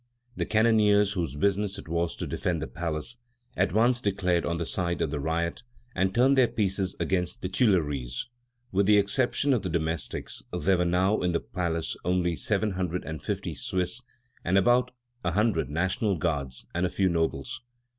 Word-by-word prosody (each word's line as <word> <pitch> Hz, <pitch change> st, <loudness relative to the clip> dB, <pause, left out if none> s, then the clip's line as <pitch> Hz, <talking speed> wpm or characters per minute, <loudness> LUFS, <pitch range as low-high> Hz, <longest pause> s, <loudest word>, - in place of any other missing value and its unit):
The -, -, -2 dB
cannoneers, 105 Hz, -2 st, +4 dB
whose 85 Hz, -7 st, -2 dB
business 100 Hz, +4 st, 0 dB
it 100 Hz, -, -9 dB
was 85 Hz, +1 st, -1 dB
to -, -, -4 dB
defend 85 Hz, -2 st, -1 dB
the 80 Hz, -, -3 dB
palace, 85 Hz, +7 st, -4 dB, 0.4 s
at -, -, +1 dB
once 120 Hz, +5 st, +3 dB
declared 90 Hz, -5 st, +1 dB
on 85 Hz, -, -1 dB
the 85 Hz, -, -2 dB
side 85 Hz, -1 st, -2 dB
of -, -, 0 dB
the 75 Hz, -, -2 dB
riot 85 Hz, +5 st, -1 dB, 0.3 s
and 95 Hz, +1 st, +1 dB
turned 130 Hz, +6 st, +4 dB
their 130 Hz, -2 st, +5 dB
pieces 95 Hz, -3 st, -1 dB
against 90 Hz, +4 st, -1 dB
the 90 Hz, -, -1 dB
Tuileries. 75 Hz, -, +1 dB, 0.5 s
With 95 Hz, +1 st, +2 dB
the 105 Hz, 0 st, +6 dB
exception 120 Hz, +7 st, +2 dB
of 120 Hz, -, +1 dB
the 95 Hz, -, -3 dB
domestics 80 Hz, -2 st, -2 dB
there 95 Hz, -1 st, +1 dB
were 90 Hz, -, +2 dB
now 95 Hz, +4 st, +2 dB
in 90 Hz, -1 st, 0 dB
the 85 Hz, -, +2 dB
palace 85 Hz, -3 st, -2 dB
only 90 Hz, -1 st, +1 dB
the 85 Hz, -, -4 dB
seven 105 Hz, 0 st, 0 dB
hundred 90 Hz, -1 st, -2 dB
and 80 Hz, 0 st, -5 dB
fifty -, -, -3 dB
Swiss, 90 Hz, +5 st, -2 dB, 0.4 s
about 120 Hz, +8 st, +3 dB, 0.3 s
a 85 Hz, -1 st, 0 dB
hundred 105 Hz, -6 st, +1 dB
National 95 Hz, +5 st, 0 dB
Guards, 70 Hz, -6 st, -2 dB
and 85 Hz, -, -1 dB
a 90 Hz, -, +2 dB
few 95 Hz, +1 st, +1 dB
nobles. 85 Hz, -, -1 dB
90 Hz, 180 wpm, -27 LUFS, 85-105 Hz, 0.5 s, the